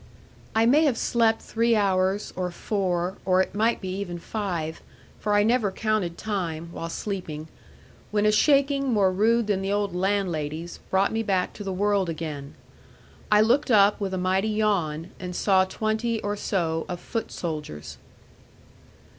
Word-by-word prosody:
I 225 +1 +4
may 290 +7 +5
have 265 -6 +2
slept 230 -2 +2
three 230 0 +1
hours, 195 -1 +1
or 180 -1 -2
four, 180 -1 -2
or 185 -1 +3
it 190 - +1
might 225 +3 +1
be 190 - -4
even 175 -3 -4
five 170 -5 -4 0.4
for 210 -1 0
I 205 - +5
never 225 -1 +2
counted 210 -5 -1
time, 170 -6 -3
while 165 -1 -5
sleeping 165 -5 -5 0.6
when 210 0 +1
a 210 - +5
shaking 275 +3 +3
more 200 -4 +3
rude 225 +5 +2
than 205 -2 0
the 195 +1 -2
old 205 -3 0
landlady's, 175 -4 -1
brought 190 +1 +2
me 225 - 0
back 190 -4 0
to 205 - -8
the 195 - -3
world 200 -1 +1
again. 150 -4 -5 0.8
I 210 0 +6
looked 250 +7 +3
up, 205 -3 +5
with 190 -1 -1
a - - -2
mighty 190 +3 +1
yawn; 185 -7 0
and 180 -1 -6
saw 190 -1 +3
twenty, 220 +3 -1
or 205 0 -1
so, 165 -6 -1
of 175 - -4
foot 225 +4 -4
soldiers. 150 - -6
195 Hz, 165 wpm, -25 LUFS, 180-215 Hz, 0.8 s, I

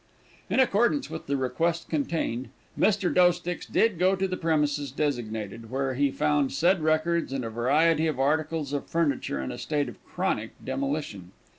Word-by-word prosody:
In - - +1
accordance 255 +3 +2
with - - -7
the 140 0 0
request 160 +6 -1
contained, 140 -6 -2 0.3
Mr. 200 -3 +2
Doesticks 175 -1 +2
did 215 -7 +2
go 185 +2 +4
to 190 0 0
the 185 - -2
premises 150 -4 0
designated, 115 -6 -3
where 135 +1 -1
he 140 +2 +2
found 145 -1 +1
said 170 +6 +3
records, 155 +1 +1
and 135 -3 -2
a 115 - -4
variety 155 +8 +3
of 150 -4 -2
articles 150 +1 0
of 145 - -3
furniture 145 - 0
in 65 - -3
a - - -7
state 145 -3 -1
of 120 - -11
chronic 175 - -2
demolition. 130 - -3
150 Hz, 165 wpm, -27 LUFS, 130-170 Hz, 0.3 s, go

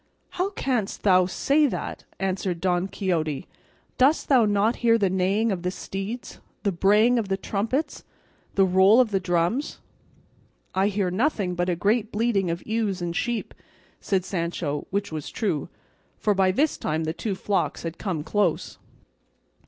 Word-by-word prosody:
"How 370 +2 -1
canst 250 - -2
thou 185 -2 +5
say 285 +10 +2
that!" - - -5
answered 190 -2 -1
Don 180 0 +1
Quixote; 165 -8 -2 0.5
"dost 275 +5 +3
thou 255 -5 +5
not 205 +2 +2
hear 230 -1 +4
the 195 -4 +1
neighing 195 +4 +1
of 185 -3 -2
the 180 - -1
steeds, 195 +5 -6 0.2
the 200 - +2
braying 210 +7 +4
of 215 - -2
the 195 0 0
trumpets, 230 +10 -2 0.5
the 195 - +5
roll 190 +5 +5
of 245 -4 +3
the 195 - +2
drums?" 180 - 0 1.0
"I 190 +1 +2
hear 200 -3 0
nothing 205 - 0
but 175 +1 -1
a 175 - +1
great 210 +5 +1
bleating 210 -4 +1
of 170 +1 -4
ewes 215 -4 -1
and 170 -1 -3
sheep," 235 +2 -2 0.5
said 190 -2 0
Sancho; 170 -5 -3
which 200 0 -2
was 155 -2 -5
true, 180 - -2 0.5
for 210 - +1
by 190 -1 +3
this 280 +11 +1
time 155 +1 -1
the 160 0 -2
two 200 +3 -3
flocks 200 +1 -1
had 165 0 -5
come 175 -7 -2
close. 185 -1 -1
195 Hz, 160 wpm, -25 LUFS, 180-225 Hz, 1.0 s, thou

